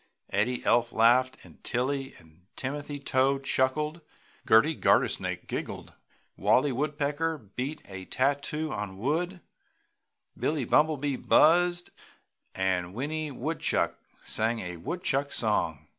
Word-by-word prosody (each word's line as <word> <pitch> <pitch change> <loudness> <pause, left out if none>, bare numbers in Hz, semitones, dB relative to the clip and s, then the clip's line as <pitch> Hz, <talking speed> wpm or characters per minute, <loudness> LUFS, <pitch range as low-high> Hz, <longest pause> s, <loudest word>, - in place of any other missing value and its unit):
Eddie 115 +5 0
Elf 120 0 +3
laughed, 130 +3 +4 0.3
Tilly 135 +2 -2
and 80 +3 -20
Timothy 145 +2 -4
Toad 135 0 +1
chuckled, 150 +5 0 0.5
Gerty - - +5
Gartersnake - - +1
giggled, - - -5 0.4
Wallie 140 +2 +3
Woodpecker 150 +3 -1
beat 125 +6 -6
a 95 -1 -8
tattoo 145 +5 -1
on 100 -2 -5
wood, 170 - -1 0.9
Billie 150 -4 -1
Bumblebee 145 -1 +2
buzzed 175 +2 +4 0.6
and 95 -1 -1
Winnie 155 +5 -3
Woodchuck 150 +4 -1 0.2
sang 115 +2 0
a 90 -2 -6
woodchuck 140 - -1
song. 95 - 0
135 Hz, 105 wpm, -28 LUFS, 115-150 Hz, 0.9 s, Gerty